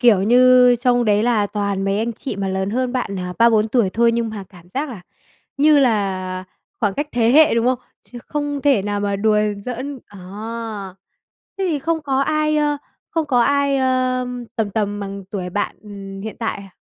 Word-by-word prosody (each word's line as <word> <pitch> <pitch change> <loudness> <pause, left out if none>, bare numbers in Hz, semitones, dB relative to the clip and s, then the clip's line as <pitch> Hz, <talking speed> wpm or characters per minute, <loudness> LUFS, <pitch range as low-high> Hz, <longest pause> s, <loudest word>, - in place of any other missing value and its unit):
kiểu, 225 -6 +5
như 250 +2 +6
trong 245 0 +2
đấy 210 -1 +3
là 225 -3 +2
toàn 200 -1 -2
mấy 195 +1 0
anh 230 +2 -1
chị 230 -1 -6
mà 195 -1 -2
lớn 190 +1 -2
hơn 250 +2 -1
bạn, 240 -6 -2
à, 180 0 -4
3-4 225 -2 +4
tuổi 225 -4 +2
thôi 230 +3 +3
nhưng 230 -1 -1
mà 210 -3 -7
cảm 175 -2 -17
giác 290 +3 -1
là 220 -7 -8 0.6
như 295 +1 +5
là 190 -7 0 0.4
khoảng 205 -3 +1
cách 290 +1 -3
thế 235 -1 +2
hệ, 310 0 +6
đúng 230 +1 +1
không? 255 -1 +2 0.3
Chứ 245 - -11
không 290 -1 -3
thể 275 -8 +3
nào 205 0 -2
mà 200 -1 -1
đùa 210 +1 +2 0.3
giỡn. 260 +3 -5
À. 205 - -14 1.4
Thế 390 - 0
thì 300 - 0
không 325 +2 -1
có 270 -2 0
ai, 305 +1 +1
ơ, 295 -1 +1 0.3
không 325 -2 -1
có 250 -4 +2
ai, 280 +1 +2
ờm, 255 -1 0
tầm 220 -3 -1
tầm 205 0 -2
bằng 200 0 -6
tuổi 185 -3 -4
bạn, 205 +3 -2
ừm, 195 -2 -9
hiện 220 +2 -6
tại 225 -2 -2
à? 195 -1 -11
235 Hz, 205 wpm, -20 LUFS, 200-260 Hz, 1.4 s, như